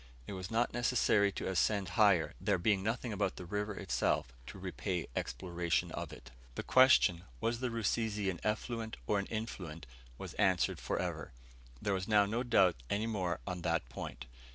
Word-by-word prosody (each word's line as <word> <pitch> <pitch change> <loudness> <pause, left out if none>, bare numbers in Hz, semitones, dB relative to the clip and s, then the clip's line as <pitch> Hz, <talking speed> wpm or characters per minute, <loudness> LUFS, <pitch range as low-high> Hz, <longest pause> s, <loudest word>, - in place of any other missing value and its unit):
It - - -6
was 95 -1 -5
not 115 +2 +1
necessary 120 -4 +3
to - - -4
ascend 95 +1 +1
higher, 95 -3 +4
there - - +2
being 95 +2 +2
nothing 115 +2 -2
about 100 -2 0
the 90 - -8
river 105 +3 -2
itself 85 -9 0
to - - -8
repay 90 -3 -3
exploration 85 +4 -1
of - - -5
it. 60 - -12 0.2
The - - -3
question, 130 -9 +5 0.2
"Was 115 +1 0
the 130 0 -1
Rusizi 110 -2 0
an 85 - -7
effluent 110 +1 -2
or 105 - +2
an 100 - -3
influent?" 90 - -5 0.3
was - - -7
answered 95 -3 +2
for - - -2
ever. - - -3 0.5
There 100 - 0
was 95 -1 -2
now 105 -2 +5
no 110 +4 -1
doubt 100 - +4
any 105 +2 0
more 90 -8 -1
on 90 -2 -4
that - - 0
point. 65 +2 -7
100 Hz, 175 wpm, -34 LUFS, 90-110 Hz, 0.5 s, question